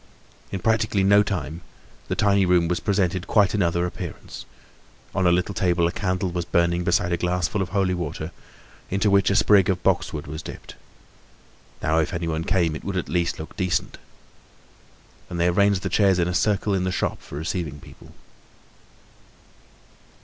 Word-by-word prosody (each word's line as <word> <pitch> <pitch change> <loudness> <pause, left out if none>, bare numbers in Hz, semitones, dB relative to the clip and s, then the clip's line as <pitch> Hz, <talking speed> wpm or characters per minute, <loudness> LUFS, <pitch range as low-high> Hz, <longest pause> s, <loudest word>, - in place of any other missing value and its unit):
In 95 - -2
practically 110 -1 +1
no 100 +1 +6
time 85 -6 -3 0.5
the - - -2
tiny 100 -1 +3
room 90 -2 +3
presented 95 -1 0
quite 105 -4 +3
another 85 -4 +1
appearance; 90 - -7 0.7
on 95 -1 +1
a - - +5
little 90 +3 0
table 90 -3 +1
a 85 - +1
candle 95 -1 -2
was 90 0 -2
burning 85 +1 +1
beside 85 0 +1
a - - +1
glass 90 -2 0
full 105 - -2
of 90 - -2
holy 95 -1 +1
water 85 -1 -4 0.6
into 100 +2 +1
which 100 0 +4
a 100 - +1
sprig 100 -2 +5
of 90 -2 -1
boxwood 75 -2 0
was 75 +2 -6
dipped. - - -10 1.1
Now, 80 +1 +2
if 80 +4 -1
anyone 80 -1 -2
came, 85 -4 +1
it - - -8
would 100 -1 -3
at 90 - -3
least 85 -1 0
look 80 - -9
decent. 90 -2 -1 1.3
And 85 - -5
they 85 +1 +3
arranged 100 +1 +2
the - - -1
chairs 95 0 +3
in 85 -1 +1
a 90 - -2
circle 100 +2 +1
in 95 -1 0
the 95 - -1
shop - - -2
for 70 - -9
receiving 80 -2 -4
people. - - -15
90 Hz, 170 wpm, -24 LUFS, 85-100 Hz, 1.3 s, no